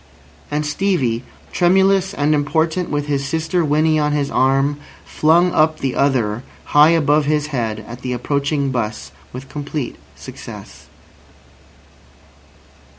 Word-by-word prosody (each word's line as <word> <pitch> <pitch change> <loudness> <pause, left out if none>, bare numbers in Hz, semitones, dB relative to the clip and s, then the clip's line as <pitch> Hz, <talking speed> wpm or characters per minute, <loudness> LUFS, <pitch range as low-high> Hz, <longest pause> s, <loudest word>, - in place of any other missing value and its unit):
And 150 +1 -2
Stevie, 145 -8 0 0.3
tremulous 190 +1 +3
and 145 +1 +1
important 160 +4 0
with 145 -1 -2
his 140 -2 -1
sister 160 +4 -1
Winnie 155 +1 +2
on 150 0 +1
his 145 -1 -1
arm, 135 +2 +2 0.3
flung 170 +3 +3
up 155 0 +2
the 135 -3 -2
other 120 -6 +1 0.3
high 150 +1 +7
above 150 -2 +3
his 150 0 0
head 110 -4 -2
at 120 +1 -9
the 125 - -4
approaching 140 +3 -1
'bus, 110 -4 -3 0.2
with 130 +2 -8
complete 145 -3 -5 0.2
success. - - -11
145 Hz, 125 wpm, -19 LUFS, 135-160 Hz, 0.3 s, high